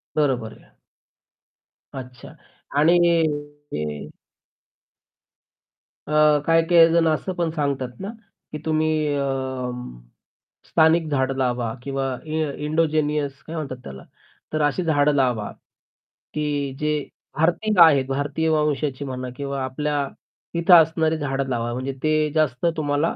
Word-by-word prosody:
बरोबर 130 Hz, -7 st, 0 dB
आहे. -, -, -25 dB, 1.2 s
अच्छा. 125 Hz, -2 st, -9 dB, 0.5 s
आणि 170 Hz, +4 st, +5 dB, 0.8 s
अ -, -, -1 dB, 2.3 s
अ, 150 Hz, -1 st, +4 dB
काही-काही 165 Hz, 0 st, +5 dB
जण 165 Hz, -1 st, +4 dB
असं 160 Hz, +4 st, -1 dB
पण 175 Hz, -2 st, -1 dB
सांगतात 140 Hz, -5 st, -2 dB
ना, 195 Hz, +2 st, -5 dB, 0.4 s
की 150 Hz, -, -4 dB
तुम्ही 155 Hz, -1 st, +1 dB
अ, 140 Hz, -, 0 dB, 1.5 s
स्थानिक 160 Hz, 0 st, +3 dB
झाडं 135 Hz, -1 st, 0 dB
लावा 120 Hz, -3 st, -1 dB
किंवा 135 Hz, 0 st, -2 dB, 0.2 s
इ 155 Hz, 0 st, -1 dB, 0.2 s
इन्डोजिनियस 150 Hz, -3 st, 0 dB
काय 165 Hz, -, -6 dB
म्हणतात 140 Hz, -5 st, -4 dB
त्याला? 65 Hz, -1 st, -9 dB, 0.5 s
तर 155 Hz, -, 0 dB
अशी 145 Hz, +5 st, +1 dB
झाडं 150 Hz, -3 st, +3 dB
लावा, 125 Hz, -6 st, +1 dB, 0.8 s
की 145 Hz, -2 st, -2 dB
जे 150 Hz, 0 st, 0 dB, 0.4 s
भारतीय 175 Hz, +7 st, +1 dB
आहेत. 140 Hz, -5 st, +5 dB
भारतीय 145 Hz, +4 st, -1 dB
वंशाची 150 Hz, -3 st, 0 dB
म्हणा 130 Hz, -1 st, -5 dB
किंवा 140 Hz, -1 st, -3 dB
आपल्या 145 Hz, +2 st, -2 dB, 0.5 s
इथे 170 Hz, +2 st, +5 dB
असणारी 160 Hz, -1 st, +5 dB
झाडं 135 Hz, -2 st, -2 dB
लावा. 120 Hz, -1 st, -2 dB
म्हणजे 130 Hz, +2 st, -3 dB
ते 155 Hz, -1 st, +2 dB
जास्त 150 Hz, -3 st, +1 dB
तुम्हाला 145 Hz, +1 st, 0 dB
150 Hz, 115 wpm, -23 LUFS, 135-160 Hz, 2.3 s, आणि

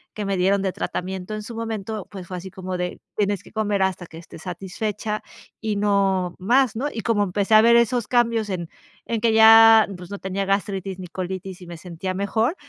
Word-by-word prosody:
que 210 Hz, -, -4 dB
me 195 Hz, -1 st, -1 dB
dieron 195 Hz, +2 st, +2 dB
de 190 Hz, -, 0 dB
tratamiento 190 Hz, +3 st, -4 dB
en 215 Hz, -, -5 dB
su 230 Hz, +2 st, -8 dB
momento, 220 Hz, -2 st, -4 dB
pues, 190 Hz, -3 st, -9 dB
fue 185 Hz, -, -5 dB
así 185 Hz, +2 st, -8 dB
como 185 Hz, -1 st, -5 dB
de: 180 Hz, 0 st, -4 dB, 0.2 s
"Tienes 205 Hz, -2 st, 0 dB
que -, -, -16 dB
comer 210 Hz, -2 st, -1 dB
hasta 190 Hz, -2 st, -2 dB
que 160 Hz, -, -12 dB
estés 165 Hz, -1 st, -12 dB
satisfecha 205 Hz, +4 st, -4 dB, 0.4 s
y 220 Hz, -2 st, -2 dB
no 195 Hz, -3 st, +1 dB
más", 245 Hz, +6 st, +2 dB
¿no?, 260 Hz, +6 st, -1 dB
y 225 Hz, -, -5 dB
como 215 Hz, -1 st, +1 dB
empecé 200 Hz, +2 st, -1 dB
a 215 Hz, -, +9 dB
ver 235 Hz, +1 st, +5 dB
esos 235 Hz, -1 st, +2 dB
cambios 230 Hz, -3 st, +1 dB
en 175 Hz, -3 st, -3 dB, 0.4 s
en 230 Hz, -, -2 dB
que 230 Hz, -1 st, +3 dB
ya, 225 Hz, 0 st, +8 dB
pues, 180 Hz, 0 st, -11 dB
no 200 Hz, -, -4 dB
tenía 190 Hz, +1 st, -3 dB
gastritis, 195 Hz, -1 st, -2 dB
ni 185 Hz, -, -7 dB
colitis 185 Hz, +1 st, -6 dB
y 180 Hz, -, -11 dB
me 170 Hz, -1 st, -8 dB
sentía 180 Hz, +2 st, -5 dB
mejor, 220 Hz, -, 0 dB
200 Hz, 215 wpm, -23 LUFS, 185-220 Hz, 0.4 s, a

